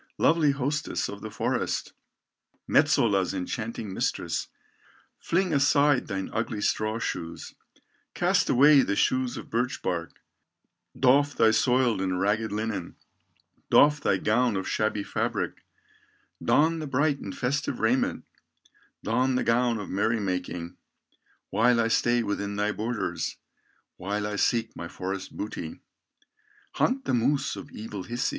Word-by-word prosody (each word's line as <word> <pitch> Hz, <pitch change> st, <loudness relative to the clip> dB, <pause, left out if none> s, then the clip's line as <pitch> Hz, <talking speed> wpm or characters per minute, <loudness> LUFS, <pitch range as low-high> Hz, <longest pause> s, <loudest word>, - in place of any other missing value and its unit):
"Lovely 160 Hz, -2 st, +3 dB
hostess 140 Hz, +1 st, -1 dB
of 100 Hz, 0 st, -8 dB
the 110 Hz, -, -6 dB
forest, 105 Hz, -, -2 dB, 0.7 s
Metsola's 100 Hz, -4 st, +3 dB
enchanting 110 Hz, +2 st, -4 dB
mistress, -, -, -2 dB, 0.7 s
Fling 180 Hz, 0 st, 0 dB
aside 140 Hz, -1 st, +3 dB
thine 95 Hz, -2 st, -3 dB
ugly 115 Hz, -1 st, -2 dB
straw 110 Hz, +1 st, 0 dB
shoes, 85 Hz, -7 st, -5 dB, 0.6 s
Cast -, -, +2 dB
away 140 Hz, +2 st, +6 dB
the 100 Hz, -, 0 dB
shoes 130 Hz, +3 st, +1 dB
of -, -, -9 dB
birch 125 Hz, +3 st, -1 dB
bark, 85 Hz, -2 st, -3 dB, 0.8 s
Doff 140 Hz, +2 st, +4 dB
thy 110 Hz, -1 st, +5 dB
soiled 125 Hz, -2 st, +2 dB
and 95 Hz, -1 st, -1 dB
ragged 105 Hz, +3 st, 0 dB
linen, 105 Hz, -4 st, -3 dB, 0.7 s
Doff 150 Hz, 0 st, +5 dB
thy 95 Hz, -, +2 dB
gown 110 Hz, +2 st, +1 dB
of 95 Hz, -, -3 dB
shabby 110 Hz, -1 st, 0 dB
fabric, -, -, -3 dB, 0.8 s
Don 160 Hz, +2 st, +3 dB
the 155 Hz, -, -5 dB
bright 140 Hz, +2 st, +1 dB
and 95 Hz, -, -7 dB
festive 130 Hz, +3 st, -1 dB
raiment, -, -, +1 dB, 0.8 s
Don 125 Hz, +4 st, +1 dB
the 125 Hz, -, +1 dB
gown 120 Hz, -1 st, +2 dB
of 105 Hz, -, -6 dB
merry 110 Hz, +4 st, 0 dB
making, 90 Hz, -3 st, -4 dB, 0.7 s
While 125 Hz, -1 st, +3 dB
I 115 Hz, 0 st, +2 dB
stay 120 Hz, +1 st, +2 dB
within 100 Hz, -1 st, -3 dB
thy 105 Hz, +1 st, 0 dB
borders, 105 Hz, -8 st, -3 dB, 0.6 s
While 105 Hz, +3 st, -3 dB
I 105 Hz, 0 st, -3 dB
seek 115 Hz, +2 st, +1 dB
my 85 Hz, -, -6 dB
forest 95 Hz, +2 st, -6 dB
booty, 90 Hz, -6 st, -5 dB, 0.9 s
Hunt 265 Hz, +1 st, 0 dB
the -, -, 0 dB
moose 130 Hz, +3 st, +1 dB
of 95 Hz, -, -9 dB
evil 105 Hz, -2 st, -7 dB
Hisi. 120 Hz, +2 st, -1 dB
115 Hz, 135 wpm, -27 LUFS, 100-130 Hz, 0.9 s, away